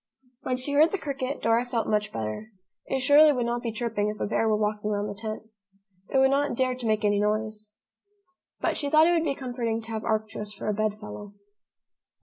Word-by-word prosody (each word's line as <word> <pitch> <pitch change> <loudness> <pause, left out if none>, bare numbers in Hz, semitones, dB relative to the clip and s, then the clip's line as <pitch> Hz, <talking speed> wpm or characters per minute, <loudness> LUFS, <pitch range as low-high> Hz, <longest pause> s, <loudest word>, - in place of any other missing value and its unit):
When 255 -1 -1
she 255 +3 -4
heard 300 +3 +5
the 395 - -2
cricket, 275 -4 -4
Dora 230 +1 +3
felt 245 -2 -2
much 210 -1 0
better. 110 - -4 0.4
It 265 - -1
surely 295 +3 +7
would 250 -4 0
not 240 0 -1
be 235 - -3
chirping 220 -2 -1
if 210 -1 -6
a - - 0
bear 225 +1 +1
were 215 - +3
walking 210 0 -1
round 205 0 -1
the 205 - -4
tent. 215 +1 -6 0.7
It - - +1
would 265 0 +5
not 285 0 +1
dare 255 -1 +2
to 250 -2 -5
make 215 0 +1
any 205 0 +3
noise. 215 0 -2 0.9
But - - 0
she 285 - -2
thought 310 +2 +6
it 345 - +4
would 330 -2 +2
be 285 -4 -1
comforting 240 -4 -2
to 225 0 -8
have 220 -1 -3
Arcturus 215 -1 -2
for 200 - -7
a 210 - +1
bed 215 0 -1
fellow. 205 -1 -9
225 Hz, 220 wpm, -26 LUFS, 210-260 Hz, 0.9 s, surely